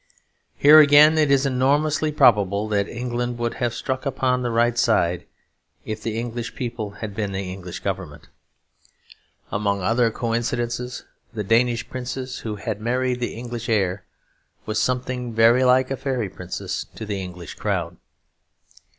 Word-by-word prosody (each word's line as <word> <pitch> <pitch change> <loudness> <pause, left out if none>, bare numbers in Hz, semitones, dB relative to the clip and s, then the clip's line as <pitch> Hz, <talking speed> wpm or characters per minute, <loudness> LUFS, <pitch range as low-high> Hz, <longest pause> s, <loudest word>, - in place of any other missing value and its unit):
Here 150 +2 +8
again, 150 +1 +7
it 150 -2 +3
is 140 0 +3
enormously 145 +4 +1
probable 105 -6 +3
that 100 -1 0
England 120 0 -3
would 120 0 -2
have 120 -1 +1
struck 130 -1 -3
upon 130 -2 0
the 120 - -1
right 120 +1 +2
side, 90 -7 +1 0.6
if 110 0 -5
the 110 0 -3
English 120 0 -4
people 120 -4 -4 0.2
had 105 - -7
been 100 -1 -3
the 95 -1 -4
English 90 -2 -8
Government. 95 -6 -5 1.2
Among 100 -2 -1
other 115 +3 +2
coincidences, 120 +1 -3 0.3
the 105 - -2
Danish 115 +3 +2
princess 130 0 -5
who 110 -2 -5
had 105 0 -5
married 125 +2 0
the 120 - -3
English 120 0 -6
heir 95 -4 0 0.6
was 110 0 -1
something 125 -1 -2
very 115 +3 +5
like 130 +1 +3
a 135 - -1
fairy 125 -7 -2
princess 90 -1 -5
to 110 - -6
the 100 -2 -3
English 90 -3 -8
crowd. - - -3
120 Hz, 150 wpm, -23 LUFS, 105-125 Hz, 1.2 s, Here